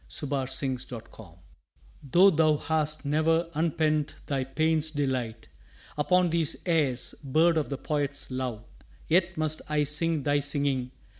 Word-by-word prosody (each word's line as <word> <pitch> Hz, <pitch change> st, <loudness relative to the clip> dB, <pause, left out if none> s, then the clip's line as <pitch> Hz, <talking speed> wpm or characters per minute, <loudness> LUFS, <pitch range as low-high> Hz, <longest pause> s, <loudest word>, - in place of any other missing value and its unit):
AVOWAL 140 Hz, -3 st, -2 dB
TO 130 Hz, -, -4 dB
THE 140 Hz, -, 0 dB
NIGHTINGALE 115 Hz, -8 st, -8 dB, 0.7 s
Tho' 190 Hz, +3 st, +7 dB
thou 155 Hz, -2 st, +3 dB
hast 155 Hz, -1 st, -1 dB
ne'er 160 Hz, +3 st, +2 dB
unpent 155 Hz, -1 st, 0 dB
thy 135 Hz, -2 st, -1 dB
pain's 155 Hz, +3 st, +1 dB
delight 130 Hz, -7 st, -2 dB, 0.5 s
Upon 180 Hz, +3 st, +2 dB
these 165 Hz, -2 st, +2 dB
airs, 150 Hz, -8 st, +1 dB
bird 160 Hz, +5 st, +3 dB
of 155 Hz, -2 st, 0 dB
the 140 Hz, -, -3 dB
poet's 145 Hz, -2 st, -2 dB
love, 125 Hz, -4 st, -3 dB, 0.4 s
Yet 175 Hz, +2 st, +2 dB
must 155 Hz, 0 st, -1 dB
I 150 Hz, -1 st, +2 dB
sing 150 Hz, +1 st, 0 dB
thy 145 Hz, +1 st, +2 dB
singing! 140 Hz, -3 st, 0 dB
150 Hz, 140 wpm, -27 LUFS, 135-160 Hz, 0.7 s, Tho